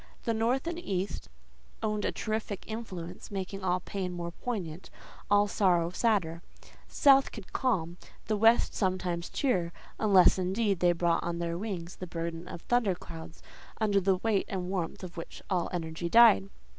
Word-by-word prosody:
The 230 - 0
north 235 +5 +1
and 340 0 -3
east 195 - -3 0.5
owned 210 -1 -1
a - - +1
terrific 215 -2 -3
influence, 185 -6 -7
making 195 -1 -5
all 180 -1 +1
pain 185 0 -4
more 170 -1 -4
poignant, 185 -6 -5 0.4
all 205 0 +5
sorrow 175 -5 +2
sadder. 180 -6 0 0.5
The - - -17
south 275 -1 +6
could 210 -5 -10
calm, 175 -10 0 0.3
the 215 - 0
west 225 +3 +4
sometimes 180 -3 -1
cheer: 185 - 0 0.3
unless, 195 -3 +5
indeed, 195 +1 0
they 175 -1 +4
brought 170 -1 +1
on 170 0 -3
their 170 0 -2
wings 180 -3 -5
the 185 - -6
burden 170 0 -5
of 175 - -8
thunder 235 -6 +1
clouds, 165 -1 -10 0.4
under 205 -3 +2
the 190 0 +3
weight 210 0 +1
and 185 -1 -3
warmth 180 -1 -3
of 180 -1 -8
which 165 - -7
all 180 -2 +1
energy 170 -1 -3
died. 170 - +7
185 Hz, 165 wpm, -30 LUFS, 170-215 Hz, 0.5 s, died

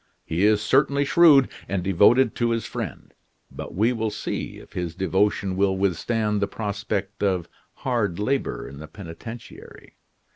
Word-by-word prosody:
He 85 +5 +1
is 105 0 +3
certainly 140 +4 +3
shrewd 145 -3 +6 0.2
and 95 -2 -1
devoted 105 +7 +4
to 120 -1 +1
his 115 -2 -1
friend; - - -6 0.4
but - - -8
we 110 +6 +2
will 110 -2 -1
see - - -4
if - - -15
his 85 -2 -4
devotion 95 0 0
will 95 0 +2
withstand 105 +3 0
the 100 - +1
prospect 100 -1 -4
of 95 -4 0 0.4
hard 115 -9 0
labor 135 +6 -1
in 70 +1 -10
the 80 - -9
penitentiary. 100 +7 -11
105 Hz, 150 wpm, -24 LUFS, 95-115 Hz, 0.4 s, shrewd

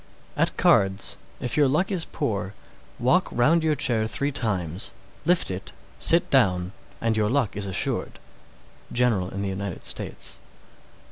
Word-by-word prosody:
608. - - +1
At - - -21
cards, 95 0 +3 0.2
if 125 - -2
your 145 -2 +5
luck 155 +9 +1
is 180 -4 +1
poor, 105 - -3 0.4
walk 150 +10 +3
round 155 +8 +3
your 155 -1 +2
chair 115 -5 +1
three 140 +5 -1
times, 95 - -2 0.3
lift 175 - +2
it, 95 +1 -6 0.3
sit 170 +1 +4
down, 95 -9 +3 0.3
and 115 -1 +1
your 105 -1 +1
luck 130 -4 +1
is 100 0 -3
assured. 95 - -1 0.7
_General 115 -7 +2
in 100 +1 -4
the 100 - -1
United 95 -1 -5
States. - - -3
115 Hz, 150 wpm, -25 LUFS, 95-140 Hz, 0.7 s, your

